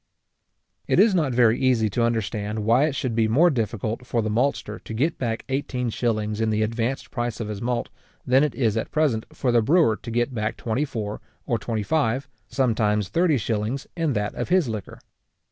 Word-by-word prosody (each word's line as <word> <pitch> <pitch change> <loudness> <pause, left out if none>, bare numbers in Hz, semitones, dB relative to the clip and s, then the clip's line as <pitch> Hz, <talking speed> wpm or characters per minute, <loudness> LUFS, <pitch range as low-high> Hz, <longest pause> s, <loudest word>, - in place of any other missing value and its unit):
It - - +3
is 215 -2 +6
not 155 -7 +1
very 120 -1 +4
easy 125 -4 +3
to 120 - 0
understand 110 -2 -1
why 120 +6 +4
it 150 -3 -2
should 130 -3 -2
be 110 0 +2
more 155 +11 +4
difficult 115 -1 -2
for 115 -3 0
the 110 - -1
maltster 115 -2 -1
to - - -9
get 150 +8 0
back 115 -3 -2
eighteen 130 -3 -2
shillings 110 -2 -1
in 110 - +1
the 110 0 +1
advanced 115 +4 -2
price 120 -2 -3
of 110 -2 -4
his 105 0 -5
malt, 120 0 -1 0.4
than 130 +3 +4
it 150 -6 -1
is 115 -4 +1
at 110 - -2
present 145 -8 0
for 125 - -1
the 120 -1 +4
brewer 145 -1 +4
to 115 - -10
get 120 +3 0
back 110 -1 -2
twenty 120 +6 -1
four 105 -6 -5 0.2
or 115 - 0
twenty 110 0 -2
five, 140 -1 0 0.2
sometimes 105 -6 +1
thirty 165 - +2
shillings, 115 +4 -2
in 165 -4 0
that 105 -2 -1
of - - -4
his 180 -5 +3
liquor. 110 -4 -5
115 Hz, 200 wpm, -24 LUFS, 110-135 Hz, 0.4 s, is